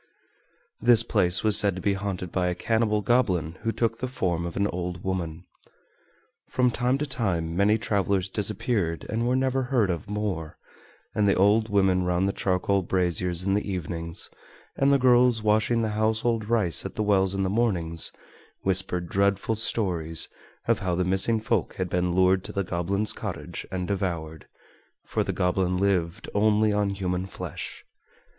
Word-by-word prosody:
This 115 0 +5
place 95 -6 +4
was 110 -1 +6
said 100 -3 +2
to 95 - -6
be 100 -2 +2
haunted 95 -3 -4
by 90 -1 0
a 90 - -1
cannibal 110 +1 0
goblin 95 -8 +1
who 115 0 -1
took 115 0 -1
the 130 - -2
form 85 -9 -2
of 85 - -7
an 100 - +2
old 90 -2 -4
woman. 90 -3 -4 1.0
From 125 -1 +2
time 125 +2 0
to 150 - -2
time 90 - -2
many 100 +3 +3
travelers 100 -3 0
disappeared 100 -3 -1
and 115 +3 -1
were 125 - +2
never 130 0 +1
heard 125 -7 +1
of 85 +4 -5
more, 100 -7 -3 0.6
and 105 -1 +2
the - - +3
old 105 +3 +3
women 95 -3 +2
round 90 +1 +1
the 100 - -1
charcoal 95 +1 0
braziers 90 -1 0
in 95 +1 0
the 105 0 -1
evenings, 85 -2 -4 0.4
and 135 +1 +2
the 140 - +5
girls 125 -3 +4
washing 110 +2 +2
the 110 - 0
household 110 +1 0
rice 105 - +2
at - - -7
the 110 - -1
wells 95 -2 +2
in 95 - 0
the - - 0
mornings, 95 -7 0 0.5
whispered 95 -2 +1
dreadful 100 +3 +1
stories 90 -7 0 0.4
of - - +2
how 90 -2 -1
the 90 +1 0
missing 95 +5 +4
folk 110 -3 -1
had 95 -1 -3
been 90 0 0
lured 95 0 +3
to - - -6
the 100 - -1
goblin's 95 +4 -1
cottage 80 +5 -6
and 90 -1 -3
devoured, 85 -5 -3 0.6
for - - -1
the - - -2
goblin 90 0 0
lived 90 -3 0
only 105 +1 +3
on 105 -1 +1
human 95 -1 -2
flesh. - - -7
100 Hz, 170 wpm, -26 LUFS, 90-110 Hz, 1.0 s, was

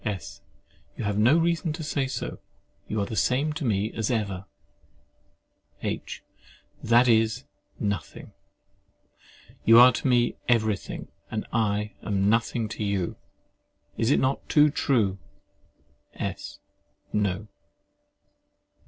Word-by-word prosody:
S. 100 -8 -5 0.6
You - - -4
have 105 0 -1
no 125 +9 +5
reason 170 -1 +1
to 160 0 -6
say 145 -3 -1
so: - - -5 0.5
you 110 - -2
are 100 - 0
the 110 - -5
same 140 +7 +1
to 155 0 -5
me 105 -2 0
as 110 -2 -2
ever. 100 -5 -2 1.4
H. - - -4 0.6
That 120 +2 +4
is, 115 +2 +3 0.4
nothing. 100 -7 -4 1.3
You 115 +1 +7
are 125 +1 +9
to 135 - -2
me 120 -2 +2
everything, 110 -4 0 0.2
and 110 - -3
I 105 -2 0
am 100 -1 +1
nothing 115 0 0
to 110 - -4
you. 100 -4 -1 0.8
Is 115 - 0
it - - +4
not 130 +1 -1
too 150 -1 +5
true? 110 -10 +1 1.0
S. - - -5 0.6
No. 105 0 -1
110 Hz, 120 wpm, -26 LUFS, 105-125 Hz, 1.4 s, are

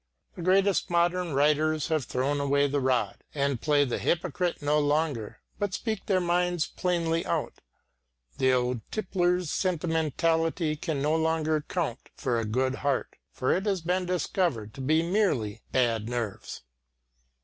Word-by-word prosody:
The - - -7
greatest 195 +2 +3
modern 175 -2 +1
writers 150 +2 +2
have 155 -5 0
thrown 140 +3 -1
away 140 0 +2
the 145 0 0
rod, 130 -2 0
and 140 -4 0
play 145 -2 +3
the 125 - -2
hypocrite 175 +1 0
no 150 +1 +2
longer, 145 -6 -1 0.2
but 205 -3 -1
speak 220 -4 -3
their 190 -2 +3
minds 175 -1 +1
plainly 170 -2 -1
out. - - -3 0.8
The 130 - +4
old 125 -2 +1
tippler's 180 -4 0
sentimentality 165 -1 0
can 150 -2 -3
no 150 +2 +2
longer 160 -1 +1
count 155 -9 -2 0.2
for 120 -3 -1
"a 115 - -2
good 130 +4 0
heart," 140 -2 -1 0.2
for 130 - -1
it 190 +3 -2
has 195 -3 0
been 180 +2 -1
discovered 170 - -1
to 135 - -8
be 155 +5 +2
merely 170 - 0
bad 115 -3 +1
nerves. 120 - -4
155 Hz, 150 wpm, -28 LUFS, 135-175 Hz, 0.8 s, The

